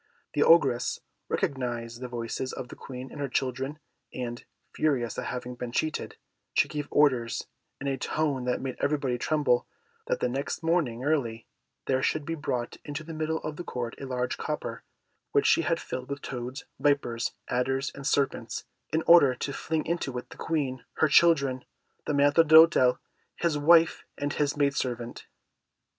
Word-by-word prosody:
The - - +1
Ogress 135 -7 +4 0.3
recognised 120 -3 -2
the 125 - -4
voices 120 +2 -4
of 125 - -6
the - - -9
Queen 130 0 -8
and 145 - -7
her 140 - -2
children, 130 +3 -2 0.3
and, 120 -1 -5 0.3
furious 130 -8 0
at - - -4
having 125 0 -4
been 125 -1 -6
cheated, 155 +5 -2 0.4
she - - +4
gave 150 -1 -4
orders, 130 -6 +2 0.3
in 140 - -6
a 135 -2 -1
tone 145 -5 -1
that 125 - 0
made 130 -2 -4
everybody 140 -4 0
tremble, 145 -5 +2 0.4
that - - 0
the - - +1
next 135 +6 -3
morning 155 -8 +1
early 125 -7 0 0.4
there 130 0 +1
should 155 +1 0
be 165 - -2
brought 125 -6 -3
into 145 +2 -5
the 165 +1 -8
middle 160 0 -1
of 150 -1 -4
the 175 - -5
court 120 -7 -4
a 135 - -5
large 125 -1 -2
copper, - - -4 0.5
which - - +3
she - - +5
had - - 0
filled 130 +1 -6
with 140 0 -5
toads, 125 +2 -5
vipers, 135 -5 +1
adders, 135 +2 0
and 140 0 -5
serpents, 135 -5 0 0.3
in 160 +1 +1
order 155 -7 +7
to 140 +3 -4
fling 160 +2 -2
into 155 -6 -2
it 125 - -7
the - - -9
Queen, 140 -6 -2
her 155 - +3
children, 140 -4 +4 0.4
the - - +1
Maître 145 +3 +5
d'Hôtel, 160 -5 +7 0.4
his 170 -3 0
wife, 165 +3 +5
and 145 0 -2
his 145 -1 0
maid 140 -1 +3
servant. 120 -2 -4
135 Hz, 170 wpm, -28 LUFS, 125-150 Hz, 0.5 s, order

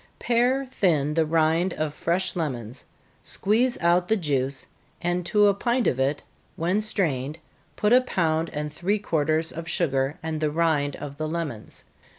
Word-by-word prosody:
_ - - -36
Pare 250 +3 +1
thin 160 - +1
the 160 0 +2
rind 165 +3 +2
of 155 -1 -2
fresh 175 +4 -1
lemons, 125 -7 -4 0.4
squeeze 235 +5 +1
out 175 +1 +3
the 220 - +3
juice, 140 -5 -1 0.3
and 175 +1 -1
to 210 +3 +4
a 200 - +5
pint 240 +4 0
of 130 - +1
it, 140 +2 0 0.3
when 180 +6 0
strained, 155 -9 -1 0.4
put 210 +2 +2
a 255 - +7
pound 165 -9 0
and 150 -1 -4
three 195 +7 0
quarters 160 -4 0
of 165 0 -7
sugar, 135 -4 0
and 160 -1 -3
the 155 - +2
rind 150 -3 +1
of 140 0 -8
the 155 +1 -2
lemons. 155 -9 -5
165 Hz, 165 wpm, -25 LUFS, 150-190 Hz, 0.4 s, a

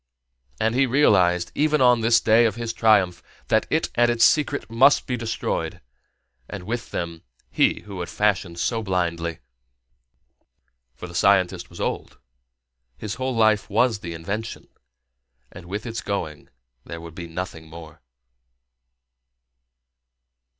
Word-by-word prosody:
And 110 +1 +1
he 135 +2 +2
realized 90 -10 +3
even 150 0 +1
on 125 -2 +4
this 115 +1 +4
day 115 +2 +4
of 110 -3 0
his 115 -1 -4
triumph 105 -6 +3 0.3
that - - +2
it - - 0
and 120 0 +3
its 120 -1 +4
secret 145 -2 +1
must 130 +6 +4
be 125 - -2
destroyed, 115 -1 -3 0.7
and 100 - -7
with 115 +4 -4
them 85 -1 -5 0.3
he - - +2
who 100 -3 -9
had 90 - -5
fashioned 100 -5 0
so 115 +6 -1
blindly. 85 -5 -2 1.5
For 80 - -9
the 90 - -10
scientist 90 -1 +2
was 85 - -13
old, - - -4 0.8
his 105 +6 -5
whole 130 -1 -1
life 110 -2 +2
was 110 +1 +2
the 85 -3 -7
invention, 105 +8 -6 0.8
and 85 - -12
with 105 +5 -5
its 115 -1 -4
going 85 -7 -5 0.3
there 85 - -8
would 85 -1 -10
be 85 0 -8
nothing 80 -1 -7
more. 80 -1 -12
105 Hz, 135 wpm, -23 LUFS, 85-115 Hz, 1.5 s, on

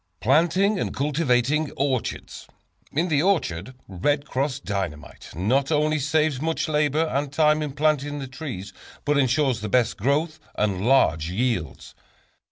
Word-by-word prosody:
Planting 175 - +2
and - - -3
Cultivating 145 0 +1
Orchards. 135 -3 -3 0.4
In 165 +5 0
the 150 -4 +2
orchard 130 - 0
"Red 140 +11 -1
Cross" 135 0 -2
Dynamite 95 - -5
not 130 - +1
only 155 0 +2
saves 150 -1 +1
much 160 +1 -1
labor 150 +1 +1
and 140 +1 -1
time 150 +1 +3
in 150 -3 -3
planting 145 0 0
the 140 - -5
trees, 125 - -7 0.3
but 145 -1 +2
ensures 130 -3 +1
the 105 - -4
best 125 +1 +2
growth 150 - 0 0.2
and 100 -3 0
large 80 - +3
yields. 115 - -2
140 Hz, 140 wpm, -24 LUFS, 120-155 Hz, 0.4 s, time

